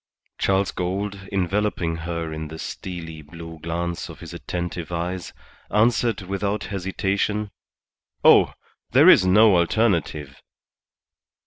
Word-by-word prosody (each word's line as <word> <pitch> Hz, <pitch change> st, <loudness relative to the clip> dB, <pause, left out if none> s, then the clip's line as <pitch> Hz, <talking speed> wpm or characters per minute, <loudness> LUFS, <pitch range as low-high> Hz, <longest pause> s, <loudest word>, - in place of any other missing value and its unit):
Charles 95 Hz, 0 st, +2 dB
Gould, 95 Hz, +2 st, -3 dB
enveloping 95 Hz, -3 st, 0 dB
her 85 Hz, -1 st, -4 dB
in 80 Hz, 0 st, -5 dB
the 80 Hz, +1 st, -8 dB
steely 80 Hz, -3 st, -7 dB
blue 80 Hz, +2 st, -10 dB
glance 85 Hz, +2 st, -3 dB
of -, -, -10 dB
his -, -, -9 dB
attentive 85 Hz, -2 st, -5 dB
eyes, 90 Hz, +1 st, -3 dB, 0.4 s
answered 115 Hz, 0 st, +2 dB
without 100 Hz, +2 st, -2 dB
hesitation 100 Hz, +2 st, -2 dB, 0.7 s
"Oh, -, -, +6 dB, 0.4 s
there -, -, +6 dB
is 95 Hz, -, +7 dB
no 105 Hz, +2 st, +6 dB
alternative." 85 Hz, -, 0 dB
90 Hz, 110 wpm, -23 LUFS, 85-100 Hz, 0.7 s, is